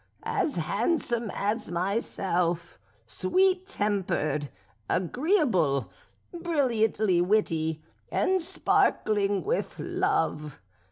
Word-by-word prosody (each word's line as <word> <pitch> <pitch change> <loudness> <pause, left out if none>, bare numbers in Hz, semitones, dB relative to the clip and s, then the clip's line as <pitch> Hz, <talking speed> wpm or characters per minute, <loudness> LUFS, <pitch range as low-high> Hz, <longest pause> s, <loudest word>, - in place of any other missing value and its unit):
as 300 - -1
handsome 230 - 0
as 210 +1 -1
myself, 175 -2 -1 0.3
sweet 370 - +1
tempered, 190 - -1 0.4
agreeable, 190 - +1 0.4
brilliantly 230 - +1
witty, 165 -5 +1 0.3
and 375 0 +2
sparkling 205 -10 +1
with 485 +4 -2
love. 360 - -1
205 Hz, 70 wpm, -27 LUFS, -, 0.4 s, and